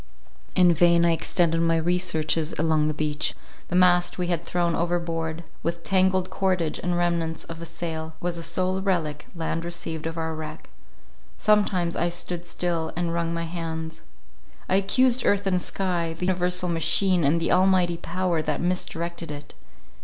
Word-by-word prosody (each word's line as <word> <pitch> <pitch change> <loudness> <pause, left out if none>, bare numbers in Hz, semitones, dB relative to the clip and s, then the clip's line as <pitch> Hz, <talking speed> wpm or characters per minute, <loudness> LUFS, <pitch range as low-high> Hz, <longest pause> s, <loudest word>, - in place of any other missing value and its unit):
In 180 -2 +6
vain 170 +1 +4
I 170 - +4
extended 165 0 +2
my 165 0 +2
researches 165 -2 +2
along 155 -1 +2
the 155 - 0
beach; 150 0 0 0.3
the 175 - -3
mast 180 -1 +4
we 180 -1 -2
had 170 -2 -1
thrown 170 0 0
overboard, 170 -1 -2 0.2
with 170 0 -3
tangled 185 0 +2
cordage, 180 -5 0
and 175 -1 -1
remnants 170 -2 0
of 165 0 -9
a 170 - -5
sail, 160 -1 -5
was 175 0 -2
the 170 - -6
sole 185 +3 -1
relic 160 -6 -1
land 165 0 -2
received 165 -2 -4
of 165 0 -5
our 160 0 -2
wreck. 155 0 -8 0.7
Sometimes 200 -5 +2
I 175 - +1
stood 175 0 -4
still, 170 -2 -2
and 170 -1 -1
wrung 170 -1 -1
my 170 0 -2
hands. 160 -1 -5 0.7
I 190 - +3
accused 245 +5 +3
earth 200 0 +2
and 185 -2 +1
sky 175 -4 -2
—the 180 - -3
universal 180 0 +1
machine 175 +2 +2
and 150 +4 +3
the 165 - 0
Almighty 180 -2 +3
power 175 -1 -1
that 150 -1 -2
misdirected 170 -2 -2
it. 145 0 -8
170 Hz, 165 wpm, -25 LUFS, 165-180 Hz, 0.7 s, In